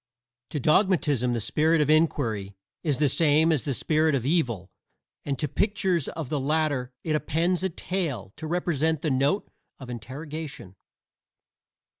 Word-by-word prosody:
To 150 - -3
Dogmatism 150 - +2
the 120 - 0
Spirit 155 +8 +2
of 150 - +2
Inquiry 120 -11 +1 0.3
is 145 -5 0
the 150 - +3
same 155 +3 +4
as 150 -5 +2
the 140 - -2
Spirit 155 +1 +2
of 125 -3 -2
Evil, 120 - 0 0.5
and 140 -2 -1
to 150 - -1
pictures 190 - 0
of 160 -6 -5
the 150 - -1
latter 145 -3 0
it 155 -2 0
appends 170 +4 0
a 190 - +1
tail 155 - -3
to 160 - -6
represent 160 -2 0
the 155 - 0
note 140 +9 +1 0.3
of 130 -3 -9
interrogation. 140 - -7
150 Hz, 150 wpm, -26 LUFS, 130-160 Hz, 0.5 s, same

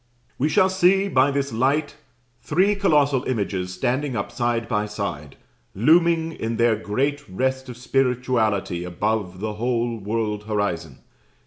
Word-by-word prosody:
"We 145 +4 +2
shall 190 +2 +3
see 190 +1 +3
by 135 -4 +4
this 140 -2 -2
light 145 +5 0 0.5
three 195 +3 +2
colossal 145 -9 +2
images 100 -6 -2
standing 130 +7 -1
up 100 - -3
side 120 -2 -1
by 105 -3 -1
side, 90 -9 -5 0.4
looming 165 - +3
in 115 -7 -4
their 115 -1 +3
great 135 +8 -2
rest 130 +6 -2
of 120 - -8
spirituality 125 -8 0
above 95 +1 -2
the 110 0 -2
whole 120 +1 -1
world 105 0 -2
horizon. 90 -9 -3
120 Hz, 135 wpm, -23 LUFS, 105-140 Hz, 0.5 s, by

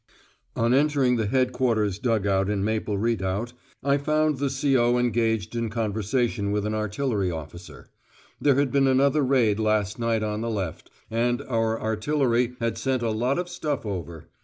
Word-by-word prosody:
On 115 +1 +2
entering 140 -3 +3
the 110 -2 0
Headquarters' 120 -5 +1
dug 115 -4 0
out 95 0 +1
in 100 -2 0
Maple 110 -1 -1
Redoubt, 110 +1 -1 0.3
I 140 +1 +2
found 155 0 +1
the 140 0 0
C.O. 130 -3 +2
engaged 115 -3 0
in 115 -1 -1
conversation 110 0 -1
with 105 0 -1
an 105 - -1
artillery 105 -1 -1
officer: 80 +2 -8 0.5
there 140 -2 +4
had 140 -2 +1
been 135 0 +3
another 140 +3 +3
raid 125 -6 +2
last 110 -1 0
night 115 -2 0
on 105 0 -2
the 115 - -2
left, 95 -7 -4 0.2
and 120 +3 0
our 115 -3 0
artillery 120 +2 0
had 115 -1 -2
sent 130 -2 -1
a 115 - 0
lot 120 +5 0
of 180 0 -2
stuff 150 -7 -3
over. 85 -5 -6
115 Hz, 165 wpm, -25 LUFS, 105-130 Hz, 0.5 s, there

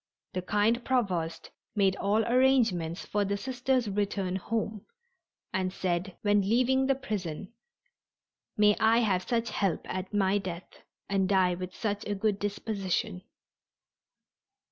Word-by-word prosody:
The 185 - -1
kind 210 +6 +1
Provost 185 -11 -1 0.2
made 195 -2 +3
all 210 +2 +1
arrangements 235 -10 +2
for 205 0 0
the 200 0 -1
Sisters' 255 +1 0
return 200 -2 -1
home, 215 +1 -3 0.7
and 185 -1 0
said, 185 0 -2
when 205 -1 +4
leaving 255 +6 +2
the 270 - +3
prison: 200 - -5 1.0
"May 210 0 +5
I 220 +1 +5
have 190 -5 0
such 235 -1 0
help 195 -5 0
at 185 0 -4
my 200 -1 +2
death 180 -2 -8 0.3
and 195 -1 +1
die 185 -2 +3
with 180 +1 -6
such 205 -2 -2
a 205 - -1
good 200 0 0
disposition." 200 -2 -2
205 Hz, 130 wpm, -29 LUFS, 185-225 Hz, 1.0 s, May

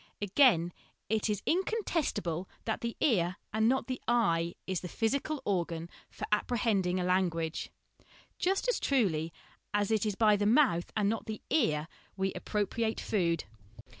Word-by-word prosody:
Again, 200 - +4 0.4
it 220 0 +1
is 210 -2 -1
incontestable 330 - -1 0.2
that 220 - -2
the 235 0 -3
ear, 185 - +2 0.2
and 220 +1 +3
not 265 +1 +1
the 255 -1 -4
eye, 170 -8 +2
is 185 -2 -2
the 180 - -5
physical 275 - -1
organ 170 -3 -1 0.2
for - - -6
apprehending 210 -5 +1
a - - 0
language, 175 -3 0 0.7
just 385 +6 +1
as - - +1
truly 175 - +1 0.4
as 205 +1 +1
it 220 -2 +2
is 210 -3 -1
by 210 -1 +4
the 205 0 +1
mouth, 225 - +3
and 210 -2 +2
not 225 +2 -1
the 215 -1 -5
ear, 155 - +2 0.3
we 190 0 0
appropriate 220 +2 -1
food. 170 -6 0
205 Hz, 150 wpm, -31 LUFS, 175-235 Hz, 0.7 s, Again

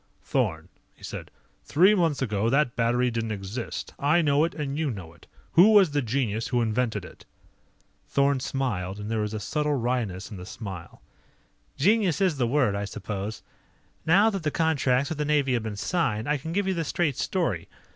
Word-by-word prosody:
"Thorn," - - -1 0.3
he - - -21
said, - - -7 0.3
"three 185 +8 +5
months 165 -8 +1
ago 110 -2 0
that 135 -1 +2
battery 120 +1 +2
didn't 115 -1 -2
exist. 105 +4 -5
I 155 +5 +3
know 145 0 +3
it 170 - -5
and 140 -3 -3
you 155 -1 0
know 95 -8 -7
it. 85 - -21 0.2
Who 200 +6 +7
was 195 -6 +6
the 145 0 +1
genius 115 -3 -1
who 125 - 0
invented 115 0 0
it?" - - -14 0.8
Thorn 140 -1 +2
smiled, 105 -9 -2
and 105 +1 -6
there 110 - 0
was 105 +1 -3
a - - -3
subtle 150 +7 -1
wryness 115 -6 -2
in 100 - -7
the 90 - -8
smile. 95 -7 -8 0.7
"Genius 195 0 +3
is 185 -6 +2
the 125 -3 +1
word, 125 -5 +2
I 100 0 -2
suppose. 105 +1 -5 0.6
Now 200 +7 +5
that 195 -3 -3
the 155 - 0
contracts 140 -4 +1
with 160 - -4
the - - +1
Navy 145 -3 +2
have 120 - +1
been 110 -1 -5
signed, 110 - -1
I 150 0 +1
can 160 +4 -6
give 200 +3 0
you 190 - +1
the 170 -2 -1
straight 155 -2 0
story. 165 - -1
130 Hz, 195 wpm, -26 LUFS, 110-155 Hz, 0.8 s, Who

